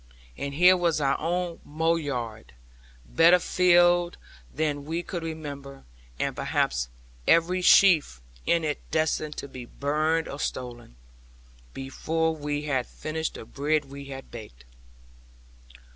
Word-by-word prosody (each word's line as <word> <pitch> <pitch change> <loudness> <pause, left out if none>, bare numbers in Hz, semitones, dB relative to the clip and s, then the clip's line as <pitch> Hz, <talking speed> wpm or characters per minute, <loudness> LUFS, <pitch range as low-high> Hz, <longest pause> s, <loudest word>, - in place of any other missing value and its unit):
And 140 0 -5
here 180 +4 +7
was 170 -3 +1
our 140 -1 +2
own 175 +1 -2
mow 160 +3 0
yard, 120 - -5 0.5
better 165 - +5
filled 175 -1 +3 0.3
than 145 -1 -1
we 165 +4 -3
could 175 -1 -5
remember, 145 -4 -7 0.3
and - - -2
perhaps - - 0 0.4
every 175 +2 +4
sheaf 170 - +5 0.3
in 170 -1 +3
it 150 -2 -2
destined 155 -1 -1
to - - -5
be 130 -3 -9
burned 155 +5 0
or 140 - -7
stolen, 120 - -5 0.8
before 160 +4 -1
we 145 -1 -3
had 135 -4 -1
finished 160 +1 -4
the - - -8
bread 150 +4 0
we 140 0 -8
had 135 -1 -9
baked. 105 - -11
155 Hz, 130 wpm, -26 LUFS, 140-165 Hz, 0.8 s, here